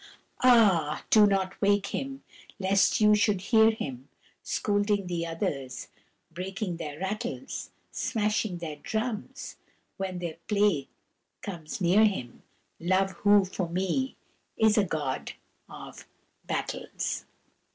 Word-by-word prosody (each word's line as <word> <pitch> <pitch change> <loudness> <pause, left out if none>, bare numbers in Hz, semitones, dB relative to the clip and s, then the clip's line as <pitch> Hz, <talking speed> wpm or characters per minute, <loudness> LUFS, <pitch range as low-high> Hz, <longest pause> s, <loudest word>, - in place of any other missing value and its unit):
Ah, 205 -12 +4
do 215 -2 +8
not 195 -1 -1
wake 200 0 +3
him, 270 0 -4 0.3
lest 195 0 +3
you 210 0 +6
should 210 -2 +3
hear 220 +3 +5
him 135 - -5 0.3
Scolding 205 -1 0
the 170 -1 -2
others, 140 -5 -4 0.4
breaking 185 +1 -4
their 150 -3 -6
rattles, 215 - -4 0.2
Smashing 210 -4 -1
their 160 -3 -6
drums, 225 - -4 0.4
when 190 -1 -3
their 170 -3 -5
play 200 -9 +2 0.6
comes 170 -5 -6
near 190 +4 +5
him 190 - -1 0.4
Love 185 +3 +2
who, 205 -1 +5
for 185 -2 -3
me, 190 +10 -1 0.4
is 220 -1 +4
a 210 - +4
god 150 -7 -3 0.4
of - - -10 0.4
battles! - - -3
195 Hz, 115 wpm, -28 LUFS, 170-210 Hz, 0.6 s, do